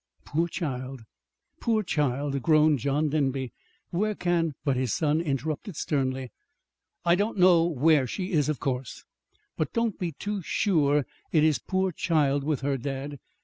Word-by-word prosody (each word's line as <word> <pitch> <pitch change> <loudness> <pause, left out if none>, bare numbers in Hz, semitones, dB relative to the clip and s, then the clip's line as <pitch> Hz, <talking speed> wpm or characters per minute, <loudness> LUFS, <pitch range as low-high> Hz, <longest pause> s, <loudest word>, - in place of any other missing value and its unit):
"Poor 165 +3 0
child, 135 -7 -4 0.6
poor 220 -2 +1
child!" 140 -4 -1
groaned 155 0 +4
John 145 +5 0
Denby. 135 -4 -1 0.4
"Where 210 +4 0
can 170 -5 0
" - - -44
But 140 -3 +2
his 125 -3 -1
son 155 0 +1
interrupted 155 +4 -3
sternly. 130 -4 -1 0.7
"I 170 - +5
don't 205 +4 0
know 180 -2 +6
where 150 -3 +3
she 185 +9 -4
is, 150 -4 +2
of 150 - -1
course. 130 -3 -3 0.5
But 155 - -2
don't 230 -3 0
be 175 -3 -2
too 205 +6 -4
sure 150 -6 +2 0.3
it 155 -2 +4
is 155 -2 +3
'poor 190 0 0
child' 145 -4 +1
with 145 -2 -1
her, 140 0 0
dad. 135 +2 -5
150 Hz, 155 wpm, -27 LUFS, 135-170 Hz, 0.7 s, know